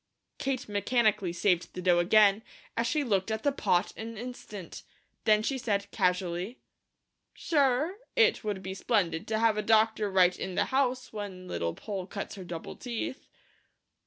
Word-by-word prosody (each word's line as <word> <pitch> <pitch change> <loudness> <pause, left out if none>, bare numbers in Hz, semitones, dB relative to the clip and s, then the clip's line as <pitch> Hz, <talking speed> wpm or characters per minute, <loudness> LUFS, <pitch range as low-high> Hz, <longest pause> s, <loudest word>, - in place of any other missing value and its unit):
Kate 260 -2 -2
mechanically 210 -2 +1
saved 175 -1 0
the - - -4
dough 175 -1 +4
again, 205 +3 +5 0.3
as 230 +1 0
she 295 +4 +1
looked 200 -5 0
at 220 0 -2
the 285 - +3
pot 180 -9 +1
an 225 0 -7
instant, 215 -6 -8 0.4
then 215 -1 +4
she 265 +3 -1
said 205 -4 -1
casually: 180 +4 0 0.8
"Sure! 290 +4 +1 0.2
It 455 - +4
would 205 -3 -3
be 190 +1 -4
splendid 190 -3 0
to 220 - 0
have 225 -1 +3
a - - +1
doctor 220 -1 +3
right 185 -2 +4
in 185 - -4
the - - +2
house 260 -2 0
when 195 -4 -6
Little 85 - -2
Poll 195 -4 -5
cuts 200 - -5
her 190 - -8
double 175 -2 -7
teeth." 245 +1 -5
210 Hz, 160 wpm, -29 LUFS, 185-240 Hz, 0.8 s, again